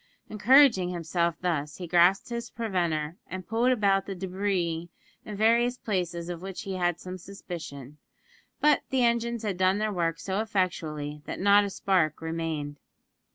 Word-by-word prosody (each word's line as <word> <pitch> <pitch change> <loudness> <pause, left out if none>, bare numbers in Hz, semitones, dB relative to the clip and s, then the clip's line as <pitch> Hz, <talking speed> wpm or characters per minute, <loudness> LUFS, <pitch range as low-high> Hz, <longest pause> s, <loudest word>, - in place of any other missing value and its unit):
Encouraging 220 -3 +5
himself 170 -1 -1
thus, 150 -5 -1
he 180 - -6
grasped 175 +5 +3
his 235 0 -4
preventer, 175 -8 -2
and 185 -1 -7
pulled 235 +3 +2
about 200 -5 +2
the 195 - -4
debris 180 -3 -2 0.4
in 210 - -6
various 235 +3 +3
places 175 -6 -2
of 175 -1 -5
which 190 0 -6
he 195 - -4
had 175 -2 0
some 185 0 -7
suspicion; 155 -7 -9 0.6
but 300 -1 +4
the 260 -2 +2
engines 235 -1 +1
had 200 -4 -2
done 185 +1 +3
their 215 0 -1
work 165 -2 -1
so 195 +1 -2
effectually 160 -8 -2
that - - -5
not 205 +1 +5
a - - -3
spark 180 -6 +1
remained. 160 -3 -4
185 Hz, 155 wpm, -27 LUFS, 170-210 Hz, 0.6 s, Encouraging